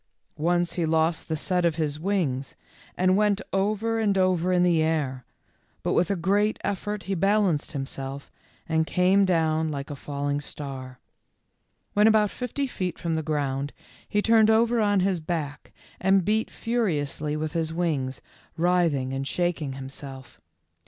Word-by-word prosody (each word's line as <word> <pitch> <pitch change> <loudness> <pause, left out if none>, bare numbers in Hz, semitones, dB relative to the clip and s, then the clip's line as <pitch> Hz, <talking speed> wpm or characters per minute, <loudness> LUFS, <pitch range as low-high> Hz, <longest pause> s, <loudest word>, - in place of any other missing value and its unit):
Once 175 +1 +1
he 175 - -1
lost 160 +1 +1
the 160 - -1
set 180 +3 0
of 170 -2 +2
his 155 -2 -2
wings, 160 -8 -1 0.4
and 185 +1 +3
went 205 0 +3
over 215 +3 +1
and 205 -3 +2
over 185 -1 +2
in 180 -1 +3
the 170 -3 +3
air, 145 -6 -1 0.6
but - - 0
with 175 - +2
a 200 - +1
great 200 +5 +1
effort 205 +1 -3
he 195 - -2
balanced 195 -4 +1
himself 135 0 -5 0.4
and 160 0 +1
came 190 +2 +4
down 160 -3 +1
like 140 0 -5
a - - -4
fall 140 0 -4
ing 145 0 0
star. 135 -3 -7 1.0
When 210 +1 +5
about 215 -2 +4
fifty 250 +3 -3
feet 185 -8 -3
from 170 -2 -2
the 160 - 0
ground 145 -2 -2 0.4
he 210 0 +1
turned 225 -1 +5
over 230 +1 +3
on 205 -2 +3
his 185 -3 +1
back 155 -3 -4 0.3
and 190 -1 +3
beat 220 +1 +1
furiously 155 - -1
with 155 0 -3
his 165 -2 -1
wings, 150 -6 -2 0.3
writhing 165 -7 +2
and 135 +1 -3
shaking 170 -6 -1
himself. 135 -1 -9
170 Hz, 160 wpm, -26 LUFS, 145-195 Hz, 1.0 s, When